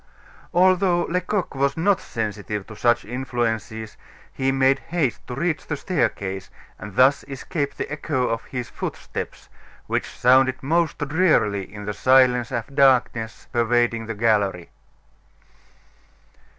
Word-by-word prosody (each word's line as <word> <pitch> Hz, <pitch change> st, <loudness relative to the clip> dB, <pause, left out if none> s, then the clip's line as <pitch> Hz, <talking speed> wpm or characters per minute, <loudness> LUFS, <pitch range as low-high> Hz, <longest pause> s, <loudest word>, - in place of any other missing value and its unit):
Although 180 Hz, 0 st, +3 dB
Lecoq 180 Hz, +2 st, -2 dB
was 140 Hz, +1 st, 0 dB
not 195 Hz, +3 st, +2 dB
sensitive 105 Hz, -2 st, -4 dB
to 110 Hz, -, -11 dB
such 120 Hz, +2 st, +2 dB
influences, 115 Hz, -3 st, -3 dB, 0.4 s
he 135 Hz, 0 st, 0 dB
made 135 Hz, 0 st, +3 dB
haste 160 Hz, -8 st, -1 dB
to 125 Hz, -, -5 dB
reach 160 Hz, +3 st, -2 dB
the 150 Hz, -, -2 dB
staircase 95 Hz, -, -2 dB, 0.3 s
and 105 Hz, -2 st, -9 dB
thus 135 Hz, +2 st, +4 dB
escape 140 Hz, +1 st, -4 dB
the -, -, -4 dB
echo 145 Hz, -4 st, -1 dB
of 115 Hz, 0 st, -2 dB
his 125 Hz, -2 st, -5 dB
footsteps, -, -, -6 dB, 0.4 s
which -, -, -2 dB
sounded 130 Hz, +1 st, +3 dB
most 165 Hz, +3 st, +1 dB
drearily 140 Hz, -, +2 dB
in 105 Hz, 0 st, -8 dB
the 105 Hz, -, -3 dB
silence 125 Hz, 0 st, +4 dB
and 120 Hz, -3 st, -2 dB
darkness 125 Hz, -5 st, +2 dB
pervading 120 Hz, -1 st, +1 dB
the 115 Hz, -, -4 dB
gallery. 100 Hz, -5 st, +1 dB
125 Hz, 125 wpm, -23 LUFS, 110-145 Hz, 0.4 s, thus